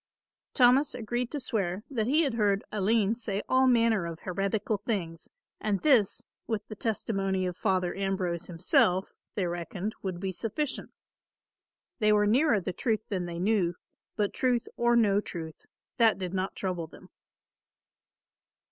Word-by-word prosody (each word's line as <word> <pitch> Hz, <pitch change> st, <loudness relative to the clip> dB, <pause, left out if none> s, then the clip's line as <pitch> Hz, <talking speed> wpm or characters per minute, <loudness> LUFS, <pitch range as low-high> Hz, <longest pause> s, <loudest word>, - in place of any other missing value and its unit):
Thomas 260 Hz, +2 st, +5 dB
agreed 240 Hz, +1 st, -2 dB
to 295 Hz, -, -3 dB
swear 200 Hz, -6 st, -1 dB
that 225 Hz, -5 st, -1 dB
he 305 Hz, +6 st, +4 dB
had 275 Hz, -5 st, 0 dB
heard 205 Hz, -3 st, +1 dB
Aline 210 Hz, +1 st, +2 dB
say 215 Hz, -4 st, -3 dB
all 260 Hz, 0 st, +4 dB
manner 230 Hz, -7 st, +3 dB
of 165 Hz, -1 st, -7 dB
heretical 195 Hz, +3 st, -1 dB
things 185 Hz, -6 st, -4 dB, 0.3 s
and 205 Hz, -2 st, 0 dB
this, 255 Hz, -10 st, +3 dB, 0.2 s
with 215 Hz, -3 st, -3 dB
the 215 Hz, -, -7 dB
testimony 195 Hz, -3 st, -1 dB
of 180 Hz, -1 st, -3 dB
Father 185 Hz, -1 st, 0 dB
Ambrose 190 Hz, -3 st, -2 dB
himself, 180 Hz, +2 st, +2 dB, 0.2 s
they 195 Hz, -, 0 dB
reckoned 175 Hz, +4 st, -4 dB
would 185 Hz, -3 st, -4 dB
be 190 Hz, 0 st, -2 dB
sufficient. 230 Hz, -, -3 dB, 1.1 s
They 215 Hz, -2 st, +4 dB
were 210 Hz, 0 st, +4 dB
nearer 240 Hz, +2 st, +4 dB
the 180 Hz, -, -4 dB
truth 225 Hz, 0 st, -1 dB
than 185 Hz, -4 st, -2 dB
they 170 Hz, -1 st, -5 dB
knew, 185 Hz, -2 st, +1 dB, 0.4 s
but 205 Hz, -2 st, 0 dB
truth 250 Hz, -2 st, +1 dB
or 240 Hz, 0 st, +3 dB
no 205 Hz, -4 st, +4 dB
truth 160 Hz, -5 st, -8 dB, 0.3 s
that 225 Hz, -2 st, +5 dB
did 185 Hz, -1 st, -4 dB
not 190 Hz, 0 st, -2 dB
trouble 180 Hz, -4 st, -3 dB
them. 160 Hz, -, -16 dB
205 Hz, 150 wpm, -29 LUFS, 185-230 Hz, 1.1 s, Thomas